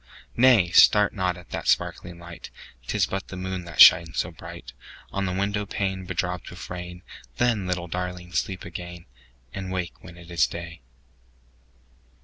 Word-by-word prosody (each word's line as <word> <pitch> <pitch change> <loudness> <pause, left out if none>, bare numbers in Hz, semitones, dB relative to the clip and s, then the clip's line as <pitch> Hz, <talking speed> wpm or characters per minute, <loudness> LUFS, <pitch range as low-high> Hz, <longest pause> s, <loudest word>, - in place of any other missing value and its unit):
10 - - -2
Nay! 120 -9 +6
start 105 +3 +6
not 90 -3 -1
at 90 - -15
that - - -4
sparkling 85 -1 0
light; 85 -1 -10 0.4
'Tis - - +1
but 95 0 -4
the 90 - -8
moon 95 -1 -4
that 85 -2 -10
shines 80 -1 +8
so - - -1
bright - - -10 0.4
On 100 -1 -1
the - - -1
window 100 +2 -1
pane 95 -2 -3
bedropped 90 -1 -3
with 90 0 -10
rain: 90 0 -7 0.3
Then, 115 -6 +1
little 90 -1 -2
Darling! 90 0 -5
sleep 95 +3 -2
again, 85 0 -8 0.5
And 95 -1 -5
wake 90 -2 -4
when 85 -1 -12
it 85 0 -13
is 85 - +3
day. 85 0 -8
90 Hz, 165 wpm, -25 LUFS, 85-95 Hz, 0.5 s, shines